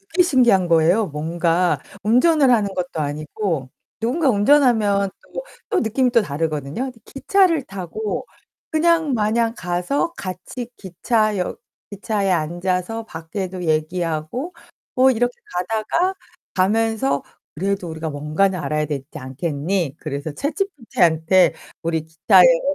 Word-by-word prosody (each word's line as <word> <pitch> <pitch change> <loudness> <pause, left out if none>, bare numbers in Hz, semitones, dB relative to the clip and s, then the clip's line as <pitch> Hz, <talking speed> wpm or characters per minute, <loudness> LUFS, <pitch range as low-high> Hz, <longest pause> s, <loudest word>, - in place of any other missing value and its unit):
되게 360 - +6
신기한 240 - +4
거예요. 170 +6 +4
뭔가 165 +3 0 0.2
운전을 275 - +4
하는 210 -5 +2
것도 180 -3 -3
아니고 150 0 -3 0.3
누군가 265 +7 +1
운전하면 210 -4 +3 0.2
또 - - -4 0.3
또 - - +2
느낌이 245 +3 +1
또 235 -1 +5
다르거든요. 150 - -3
근데 250 -3 -8
기차를 335 +1 +2
타고 195 +1 -5 0.5
그냥 320 -2 +2
마냥 225 +1 +1
가서 180 - -1
같이 195 - -6
기차역 205 +1 -1 0.3
기차에 200 -1 -1
앉아서 180 +6 -1
밖에도 180 +1 -5
얘기하고 165 - -2 0.4
뭐 260 0 +5
이렇게 245 0 +1 0.2
가다가 220 - 0 0.4
가면서 205 -7 +1 0.3
"그래도 195 +2 -2
우리가 160 0 -4
뭔가는 155 +6 0
알아야 150 -1 -1
되지 140 -3 -4
않겠니?" 150 +4 -2
그래서 145 0 -4
챗지피티한테 190 - +1 0.3
"우리 165 -1 -1
기차여행으로 175 - +4
190 Hz, 300 characters per minute, -21 LUFS, 160-235 Hz, 0.5 s, 되게